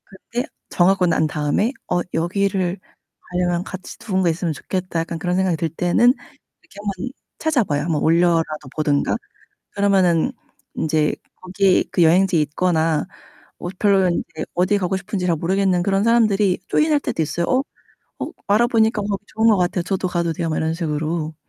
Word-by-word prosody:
그때 235 +6 -5 0.2
정하고 185 +1 +3
난 165 -2 +2
다음에 150 - 0 0.2
'어 175 0 +1
여기를 190 +1 0 0.5
가려면 180 -1 0
같이 185 0 -8
누군가 190 -4 0
있으면 165 0 -1
좋겠다.' 185 +2 -3
약간 165 0 -3
그런 180 +1 -1
생각이 185 -3 +1
들 165 +1 -1
때는 180 +10 +3 0.5
이렇게 365 - -16
한번 200 +2 -4 0.3
찾아봐요. 240 - +1
한번 160 -2 -1
올려라도 165 -3 +2
보던가. 145 -2 +1 0.6
그러면은 195 0 +2 0.4
인제 155 -1 +1 0.3
거기 185 +1 +2
그 175 - +3
여행지에 175 0 +4
있거나 160 0 +1 0.5
뭐 175 - -5
별로 195 -3 +3
인제 165 -2 -3
어디 185 +4 +2
가고 185 0 -1
싶은지 190 0 -3
잘 170 -2 +2
모르겠는 185 +2 +1
그런 195 +2 +1
사람들이 215 -5 +3
조인할 305 -1 +2
때도 165 - -2
있어요. 170 +2 -2
어 260 +1 +2 0.6
'어 - - -8
알아보니까 220 0 +3
거기 200 0 -3
좋은 220 +1 +2
것 215 - +5
같아요. 180 0 0
저도 185 +1 -2
가도 170 -2 -1
돼요.' 165 +1 -3
막 155 - -1
이런 160 0 0
식으로. 160 -1 -2
180 Hz, 360 characters per minute, -21 LUFS, 165-200 Hz, 0.6 s, 것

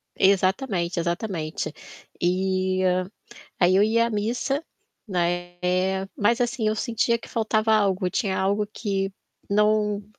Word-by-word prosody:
exatamente, 190 -2 +2
exatamente. 170 -3 -3 0.5
Eh, 185 +1 +1 0.7
aí 180 0 +4
eu 200 - +5
ia 230 +2 +3
à - - -4
missa, 235 +7 -1 0.4
né, 175 -1 -1 0.6
mas 235 +4 +2
assim, 240 -2 0
eu 215 - +1
sentia 235 +1 +1
que - - -12
faltava 220 -1 +1
algo, 195 -3 +2
tinha 190 +1 -1
algo 200 +2 +1
que 195 -2 -2 0.4
não, 210 0 +2
200 Hz, 120 wpm, -24 LUFS, 185-220 Hz, 0.7 s, eu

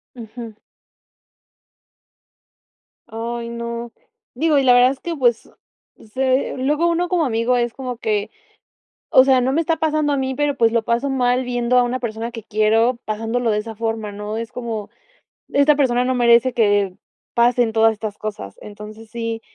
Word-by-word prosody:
Ujú. 230 -1 -9 2.5
Ay, 235 +1 -5
no, 235 0 -5 0.4
digo, 300 +3 +1
y 275 - +3
la 250 -2 +5
verdad 250 +1 +5
es 270 - -8
que, 340 -1 -4
pues, 240 -5 0 0.6
se 260 0 0
luego 295 +6 +1
uno 345 +1 0
como 350 -4 +1
amigo 240 0 +1
es 240 -1 -1
como 255 -3 -6
que 210 -3 -1 0.8
o 260 -5 +7
sea, 265 -1 +4
no 255 +2 0
me 325 - +2
está 330 0 0
pasando 310 -2 0
a 280 - +1
mí, 265 -1 -2
pero, 290 0 0
pues, 225 -1 +3
lo 230 - +2
paso 240 +4 0
mal 250 -1 +1
viendo 245 0 0
a 250 - +5
una 250 +1 -2
persona 230 0 -4
que 225 -2 -8
quiero 220 +4 +2
pasándolo 225 +2 -2
de 210 - +1
esa 225 +1 -6
forma, 225 -1 -3
¿no? 210 +1 -6
Es 230 0 -5
como: 225 -4 -5 0.6
"Esta 285 +1 +4
persona 250 -4 +2
no 260 - +1
merece 240 0 +4
que 205 -4 +2 0.4
pasen 240 -1 +3
todas 225 0 +4
estas 215 -1 -6
cosas", 205 - -6
entonces 210 +1 -11
sí 230 -1 -4
235 Hz, 170 wpm, -20 LUFS, 225-260 Hz, 2.5 s, o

